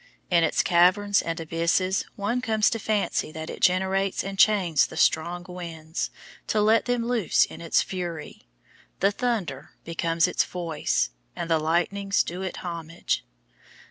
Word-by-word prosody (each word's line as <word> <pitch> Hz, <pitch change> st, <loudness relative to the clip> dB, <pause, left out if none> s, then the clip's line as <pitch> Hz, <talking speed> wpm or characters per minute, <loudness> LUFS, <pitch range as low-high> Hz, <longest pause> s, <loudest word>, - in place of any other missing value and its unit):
In 170 Hz, -1 st, +5 dB
its 160 Hz, -, +2 dB
caverns 185 Hz, +4 st, +4 dB
and 165 Hz, 0 st, -4 dB
abysses 170 Hz, +4 st, 0 dB
one 220 Hz, +5 st, -1 dB
comes 220 Hz, -4 st, +2 dB
to 225 Hz, -, -2 dB
fancy 210 Hz, -7 st, -1 dB
that 160 Hz, 0 st, -6 dB
it -, -, -9 dB
generates 190 Hz, +1 st, +2 dB
and 195 Hz, 0 st, -6 dB
chains 185 Hz, -8 st, +4 dB
the 160 Hz, -, -10 dB
strong 175 Hz, +3 st, +1 dB
winds, 165 Hz, -3 st, -5 dB, 0.4 s
to 215 Hz, -, +1 dB
let 215 Hz, +2 st, +4 dB
them 245 Hz, -2 st, 0 dB
loose 235 Hz, -7 st, +3 dB
in -, -, -11 dB
its 165 Hz, -, +2 dB
fury. 170 Hz, -, -6 dB, 0.5 s
The 195 Hz, +2 st, +3 dB
thunder 200 Hz, -, -3 dB
becomes 165 Hz, 0 st, +1 dB
its 180 Hz, -, +1 dB
voice, 165 Hz, -, -1 dB, 0.2 s
and 170 Hz, -1 st, -4 dB
the 160 Hz, -, +4 dB
lightnings 175 Hz, +5 st, +1 dB
do 180 Hz, +2 st, -6 dB
it 190 Hz, -1 st, -5 dB
homage. 170 Hz, -1 st, -3 dB
180 Hz, 150 wpm, -25 LUFS, 165-200 Hz, 0.5 s, In